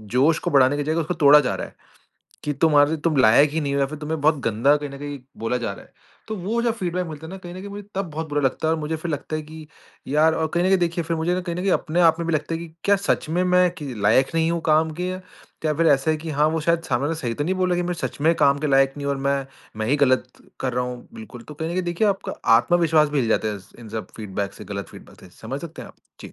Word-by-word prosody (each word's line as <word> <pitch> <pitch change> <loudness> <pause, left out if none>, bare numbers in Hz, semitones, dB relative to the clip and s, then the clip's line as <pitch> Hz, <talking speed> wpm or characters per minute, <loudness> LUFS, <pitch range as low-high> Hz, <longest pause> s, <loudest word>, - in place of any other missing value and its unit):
जोश 150 +6 +4
को 175 - -3
बढ़ाने 135 0 +4
की 145 - -1
जगह 155 +3 0
उसको 160 +3 -2
तोड़ा 150 -3 +7
जा 130 -4 -1
रहा - - -5
है, - - -19 0.7
कि 150 - 0
तुम्हारे 145 +1 +3
तुम 160 -3 +2
लायक 130 +4 +6
ही 160 +2 -1
नहीं 140 -1 -2
हो 140 - +1
या 135 - +2
फिर 155 +2 -8
तुम्हें 155 +1 -4
बहुत 150 +1 +3
गंदा 115 +6 +3
कहीं 145 0 -5
न 140 - -9
कहीं 145 -1 -6 0.2
बोला 115 +2 -1
जा 115 -5 -3
रहा - - -12
है, - - -25 0.4
तो 220 - -3
वो 210 +6 -2
जो 235 -1 +1
फ़ीडबैक 180 -4 -3
मिलता 155 0 -8
है 160 - -10
ना, 190 - -7
कहीं 175 -1 -9
न - - -8
कहीं 200 - -8
मुझे 205 +1 -7
तब 190 -3 -3
बहुत 155 +1 -5
बुरा 145 0 0
लगता 135 +4 0
है 160 - +3
और 160 - -4
मुझे 155 +2 -2
लगता 155 0 -3
है 155 - -4
कि 155 0 -11 0.4
यार 155 +3 +3
और 160 - 0
कहीं 175 - +2
न 185 - +3
कहीं 190 - +4
देखिए 170 -1 -1
फिर 165 0 -2
मुझे 175 +3 0
कहीं 170 -1 -4
न - - -3
कहीं 195 - +1
अपने 170 +1 0
आप 165 -1 +5
में 170 - -3
भी - - 0
लगता 155 +2 -2
है - - -2
कि 170 - -7 0.2
क्या 200 0 +4
सच 200 -4 -1
में 175 +3 +1
मैं 180 0 +4
कि 145 -4 -6
लायक 115 +9 +3
नहीं 165 0 +2
हूँ 170 -1 -1
काम 155 +1 +3
के? 180 +1 -1 0.5
क्या 155 -1 +1
फिर 165 +2 +1
ऐसा 140 +1 +3
है 155 - +1
कि 160 +1 -6
हाँ, 150 +1 +2
वो 160 0 -1
शायद 170 +1 +1
सामने 120 -5 0
ने 145 - +1
वाला 165 - -1
सही 120 -3 -2
तो 145 - -2
नहीं 185 +4 0
बोला 185 -1 +1
कि 175 - 0
मैं 175 0 -2
सच 165 - -5
में 160 +3 +4
काम 140 0 +4
के 150 - -2
लायक 135 -1 +3
नहीं 145 - -6
हूँ? 140 - +1
और 135 - -6
मैं 140 0 0 0.3
मैं 110 0 -2
ही 145 - +2
गलत 130 -1 +2 0.3
कर - - -1
रहा 125 +1 0
हूँ 125 -1 -7
बिल्कुल, 220 - -10
तो 150 - -11
कहीं 160 +2 -4
न - - -3
कहीं 185 - -1
देखिए 175 +4 0
आपका 195 -1 -2 0.2
आत्मविश्वास 160 +2 +3
भी 145 -1 -1
हिल 120 - -1
जाता 110 -1 +1
है 105 - -3
इस 95 0 -16
इन 115 -2 -11
सब 110 0 -5
फ़ीडबैक 100 -2 -4
से - - -11
गलत 100 -1 -6
फ़ीडबैक - - -15
से, - - -14
समझ 130 +6 -5
सकते 165 -2 -8
हैं - - -10
आप? - - -16 0.3
जी। - - -10
155 Hz, 310 wpm, -23 LUFS, 140-170 Hz, 0.7 s, तोड़ा